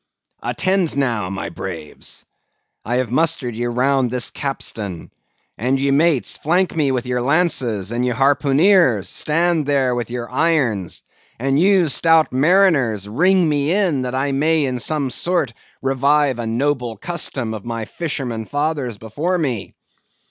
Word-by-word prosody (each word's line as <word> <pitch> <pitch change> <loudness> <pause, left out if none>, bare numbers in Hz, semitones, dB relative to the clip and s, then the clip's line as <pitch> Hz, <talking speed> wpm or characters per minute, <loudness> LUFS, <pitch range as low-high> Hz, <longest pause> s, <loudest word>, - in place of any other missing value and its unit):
"Attend 185 -6 0
now, 115 -9 0
my 95 0 -4
braves. 75 -2 -7 0.6
I 120 - -2
have 125 -2 -1
mustered 140 -5 +1
ye 120 +2 -2
all 120 - -3
round 130 0 +2
this 125 0 0
capstan; 105 - -5 0.5
and 130 +4 +1
ye 140 +1 +1
mates, 150 -1 +2
flank 175 +4 +1
me 145 -4 +1
with 130 -1 -2
your 125 0 -1
lances; 125 - +1
and 120 +1 -1
ye 125 - +1
harpooneers, 140 - +3
stand 165 -1 0
there 135 -3 +2
with 120 -1 -3
your 120 -1 -4
irons; 130 - 0 0.3
and 135 +3 +1
ye, 190 -1 +4
stout 160 +1 +3
mariners, 135 - +3
ring 180 - +3
me 145 0 +1
in, 180 -8 +1
that 125 0 -3
I 135 +2 0
may 155 +2 +2
in 130 -2 -2
some 140 0 -1
sort 170 -8 -1 0.3
revive 135 0 +2
a 115 - -3
noble 120 -1 -1
custom 130 - -2
of 105 -2 -7
my 115 -1 -4
fisherman 125 -9 -4
fathers 145 -5 -2
before 145 - -2
me. 130 - -3
135 Hz, 150 wpm, -19 LUFS, 120-160 Hz, 0.6 s, ye